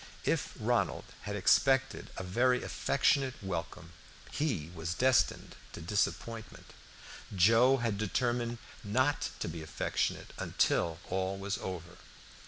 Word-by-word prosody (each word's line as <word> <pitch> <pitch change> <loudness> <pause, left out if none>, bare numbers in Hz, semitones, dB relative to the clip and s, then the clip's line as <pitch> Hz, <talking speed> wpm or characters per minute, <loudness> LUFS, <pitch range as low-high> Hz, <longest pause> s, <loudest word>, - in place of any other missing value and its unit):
If - - 0
Ronald - - +1 0.3
had 100 - -2
expected 135 +6 +3
a - - -4
very 125 +7 +2
affectionate 135 -1 +1
welcome 85 -3 -5 0.4
he 105 - -1
was 85 0 -3
destined 130 0 +2 0.2
to - - -7
disappointment; 110 +5 -3 0.6
Joe 115 +8 +6
had 115 -5 -1
determined 120 +2 0 0.3
not 130 +7 +1
to - - -1
be 80 0 -5
affectionate 80 - -2
until 85 -2 +1
all 95 +1 -1
was 100 0 -3
over. 90 -1 -6
105 Hz, 115 wpm, -32 LUFS, 90-125 Hz, 0.6 s, Joe